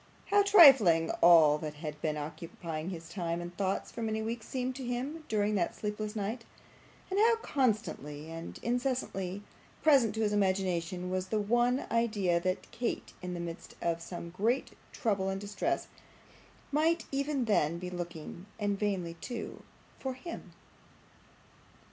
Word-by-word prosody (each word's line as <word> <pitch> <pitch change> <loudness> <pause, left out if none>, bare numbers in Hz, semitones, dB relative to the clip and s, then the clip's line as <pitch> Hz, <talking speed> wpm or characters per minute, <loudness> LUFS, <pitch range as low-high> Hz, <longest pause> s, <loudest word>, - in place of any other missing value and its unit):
How 410 0 +6
trifling 270 - +7
all 160 -3 +7
that 150 -1 -5
had 150 0 -6
been 155 -1 -1
occupying 160 +2 -5
his 165 -3 -7
time 170 -2 -3
and 175 0 -7
thoughts 195 0 -1
for 235 - -6
many 220 -1 -1
weeks 225 +1 -4
seemed 255 0 -2
to 265 - -6
him 260 +6 -3
during 210 -1 +1
that 180 -4 0
sleepless 210 0 -4
night, 220 +3 -3 0.7
and 385 - +1
how 460 +2 +6
constantly 210 - -1
and 165 0 -7
incessantly 235 -6 -1 0.4
present 270 -9 +5
to 220 - -1
his 210 -1 +1
imagination 185 -3 0
was 185 0 -1
the 215 +3 0
one 240 +5 +2
idea 210 -7 +2
that 185 +1 -2
Kate 240 0 -3
in 180 -1 -4
the - - -4
midst 170 -1 -7
of 165 -1 -1
some 170 0 -7
great 225 +9 0 0.2
trouble 200 -6 0
and 195 0 -2
distress 205 - -2 0.8
might 320 +3 +2
even 275 -1 0
then 170 -7 +2
be 180 +1 -6
looking 175 +1 -7
and 205 -1 0
vainly 190 -5 -1
too 240 -4 -6 0.4
for 265 -1 -3
him! 335 +6 -8
205 Hz, 150 wpm, -31 LUFS, 170-245 Hz, 0.8 s, trifling